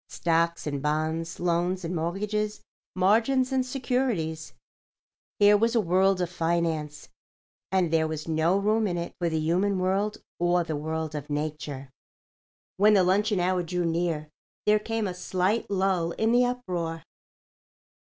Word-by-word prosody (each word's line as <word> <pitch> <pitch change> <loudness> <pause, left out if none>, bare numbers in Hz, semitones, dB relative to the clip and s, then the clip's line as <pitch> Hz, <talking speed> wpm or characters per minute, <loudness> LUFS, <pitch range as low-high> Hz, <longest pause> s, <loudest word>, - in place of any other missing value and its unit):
Stocks 170 0 0
and 145 -2 -3
bonds, 155 +2 -2
loans 175 +1 0
and 175 +2 -3
mortgages, 210 +6 -2 0.4
margins 230 +8 +3
and 260 -1 +2
securities—here 245 - -2 1.0
was 230 +3 +2
a - - +5
world 190 0 +2
of 175 - -1
finance, 165 -3 -1 0.6
and 185 -4 +2
there 160 -1 +3
was 155 0 -5
no 165 +3 +2
room 215 +2 +1
in 175 -2 -2
it 170 0 -4
for 170 -1 0
the 160 - -1
human 185 +5 +1
world 195 +3 0 0.2
or 175 0 +2
the 160 -2 -3
world 160 +1 -3
of 150 -1 -6
nature. 145 -2 -4 0.9
When 210 +2 +5
the 190 - +5
luncheon 200 +2 +2
hour 180 +1 +1
drew 175 +1 -2
near 165 -2 -1 0.3
there 210 0 +4
came 225 0 -2
a 185 - -2
slight 185 +4 -1
lull 190 -4 0
in 220 +1 +1
the 245 +1 +4
uproar. 180 -10 -3
180 Hz, 145 wpm, -27 LUFS, 160-205 Hz, 1.0 s, a